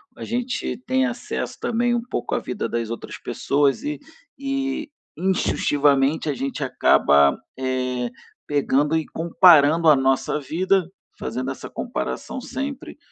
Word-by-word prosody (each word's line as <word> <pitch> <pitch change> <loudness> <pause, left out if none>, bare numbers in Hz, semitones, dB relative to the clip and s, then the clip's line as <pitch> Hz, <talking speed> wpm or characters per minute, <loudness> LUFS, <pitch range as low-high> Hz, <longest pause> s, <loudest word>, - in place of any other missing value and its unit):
a - - -8
gente 245 +2 -2
tem 260 +1 +2
acesso 255 -1 -4
também 240 +1 +1
um 240 - 0
pouco 235 - -3
à - - +1
vida - - -4
das 115 -1 -2
outras 115 - -6
pessoas 140 0 0
e 300 +1 -3 0.4
e, 275 +2 -3 0.3
instintivamente, 145 -5 +2
a - - +1
gente 135 +2 -4
acaba, 70 -1 +4 0.2
eh, 130 -1 -2 0.4
pegando 145 +1 +1
e 160 - -2
comparando 165 -1 +5
a 150 - +8
nossa 135 +2 +1
vida, 180 +5 +1 0.3
fazendo 130 +3 -3
essa 135 - -8
comparação 250 +1 -4
sempre 275 +1 -6
155 Hz, 135 wpm, -23 LUFS, -, 0.4 s, a